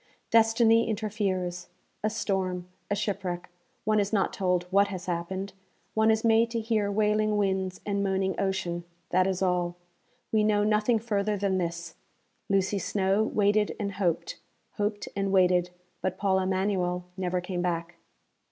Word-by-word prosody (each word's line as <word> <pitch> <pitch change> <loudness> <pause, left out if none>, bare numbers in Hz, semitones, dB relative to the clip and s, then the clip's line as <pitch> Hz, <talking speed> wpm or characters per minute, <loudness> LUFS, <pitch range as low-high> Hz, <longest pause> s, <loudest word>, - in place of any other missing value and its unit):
Destiny 225 0 +4
interferes; 195 -5 -2 0.3
a 215 - +2
storm; 190 -4 -2 0.2
a 205 - +1
shipwreck 195 -4 -3 0.3
one 215 0 +2
is 200 -1 0
not 205 0 +1
told 180 -5 +1
what 200 +1 +5
has 185 -3 -6
happened: 185 +3 -3 0.4
one 220 0 +3
is 220 0 +2
made 230 0 +4
to 230 0 -2
hear 220 -2 0
wailing 215 0 +2
winds 190 -2 -1
and 200 -1 0
moaning 190 -1 0
ocean, 180 -3 -1 0.3
that 185 +1 +3
is 190 0 -1
all; 180 -1 +1 0.6
we 215 -1 +3
know 210 -1 +3
nothing 215 +2 +3
further 210 -2 -1
than 190 -1 0
this: 170 -1 -4 0.6
_Lucy 195 0 +1
Snowe 195 +2 +1
waited 210 -1 +2
and 200 -2 -2
hoped; 185 -4 -1 0.4
hoped 205 0 -1
and 195 -1 0
waited; 180 -2 +4 0.3
but 185 0 -2
Paul 190 -2 +2
Emanuel 185 -1 0
never 180 -1 -1
came 180 0 -3
back. 170 -1 -2
195 Hz, 150 wpm, -28 LUFS, 180-210 Hz, 0.6 s, what